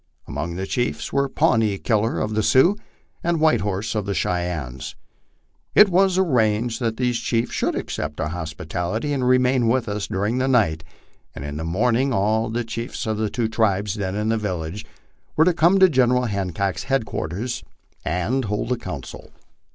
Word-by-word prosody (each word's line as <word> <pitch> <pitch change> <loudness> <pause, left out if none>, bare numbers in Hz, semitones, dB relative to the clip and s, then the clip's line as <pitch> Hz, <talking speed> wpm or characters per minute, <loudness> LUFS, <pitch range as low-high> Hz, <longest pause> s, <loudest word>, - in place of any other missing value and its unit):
Among 85 0 -4
the 95 +2 -3
chiefs 120 +4 -2
were 140 0 +1
Pawnee 110 -5 +2
Killer 110 +2 0
of 110 - -2
the 110 - +1
Sioux, 135 - +4 0.5
and 170 -1 +1
White 155 0 +3
Horse 105 +3 -2
of 105 -3 -2
the 100 - -1
Cheyennes. 85 -10 -2 0.8
It 210 - +8
was 185 +1 +3
arranged 115 - +1
that 115 -3 -1
these 125 -2 0
chiefs 115 0 -1
should - - 0
accept 75 -1 -4
our 80 -1 -1
hospitality 90 - -3
and 130 -3 0
remain 125 -1 +3
with 120 +1 +1
us 105 -1 -3
during 105 +6 -1
the 130 - +1
night, 85 -12 +2 0.5
and 70 - -6
in 75 0 -5
the 80 - -4
morning 120 +10 +1
all 110 +2 +1
the 120 +2 -1
chiefs 115 +2 -5
of 110 -1 -1
the 110 -1 0
two 120 0 -1
tribes 105 -3 +1
then 100 -3 -3
in 105 +1 -1
the 115 0 +1
village 90 -1 -4 0.5
were 160 - +5
to 180 - +4
come 170 +4 +4
to 190 -1 +7
General 125 -5 +3
Hancock's 100 -3 -2
headquarters 120 - -2 0.4
and 110 +10 -1
hold 105 +4 -2
a 125 - +1
council. 90 - -8
110 Hz, 175 wpm, -22 LUFS, 95-125 Hz, 0.8 s, It